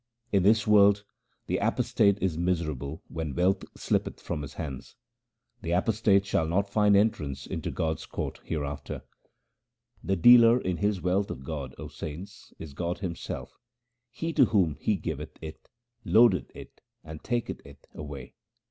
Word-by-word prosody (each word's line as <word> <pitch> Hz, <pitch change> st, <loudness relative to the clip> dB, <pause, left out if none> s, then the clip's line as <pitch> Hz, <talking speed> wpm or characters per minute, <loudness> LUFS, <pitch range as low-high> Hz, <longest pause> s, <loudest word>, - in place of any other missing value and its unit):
In 100 Hz, -, +3 dB
this 105 Hz, +3 st, +4 dB
world 100 Hz, -1 st, +5 dB, 0.4 s
the -, -, -1 dB
apostate 100 Hz, -1 st, +2 dB
is 90 Hz, -4 st, +1 dB
miserable 80 Hz, -5 st, -2 dB
when 80 Hz, -4 st, -5 dB
wealth 95 Hz, +2 st, +2 dB
slippeth -, -, -1 dB
from 75 Hz, -, -4 dB
his 70 Hz, -, -8 dB
hands: 70 Hz, -5 st, -7 dB, 0.7 s
the 85 Hz, 0 st, -2 dB
apostate 100 Hz, +1 st, +2 dB
shall 80 Hz, -5 st, 0 dB
not 100 Hz, +5 st, +1 dB
find 105 Hz, -1 st, +4 dB
entrance 75 Hz, -10 st, 0 dB
into -, -, -4 dB
God's 80 Hz, -1 st, -2 dB
court -, -, -5 dB
hereafter. 70 Hz, -3 st, -4 dB, 1.0 s
The 95 Hz, -, 0 dB
dealer 115 Hz, +5 st, +7 dB
in 95 Hz, -6 st, -2 dB
this 105 Hz, -2 st, 0 dB
wealth 95 Hz, +2 st, +1 dB
of 65 Hz, -, -6 dB
God, 70 Hz, -2 st, -6 dB
O -, -, -7 dB
saints, 95 Hz, +7 st, -9 dB
is 80 Hz, -4 st, -9 dB
God 85 Hz, +4 st, -3 dB
Him 90 Hz, -4 st, -4 dB
self; -, -, -7 dB, 0.5 s
he 165 Hz, +7 st, -4 dB
to 140 Hz, -5 st, +6 dB
whom 95 Hz, -9 st, +2 dB
He 105 Hz, -, +1 dB
giveth 90 Hz, -, -6 dB
it, 80 Hz, -1 st, -10 dB, 0.3 s
loadeth 110 Hz, -6 st, +4 dB
it -, -, -12 dB, 0.2 s
and 80 Hz, -1 st, -10 dB
taketh 120 Hz, -1 st, -2 dB
it -, -, -16 dB
away. 70 Hz, -4 st, -8 dB
90 Hz, 155 wpm, -28 LUFS, 80-100 Hz, 1.0 s, dealer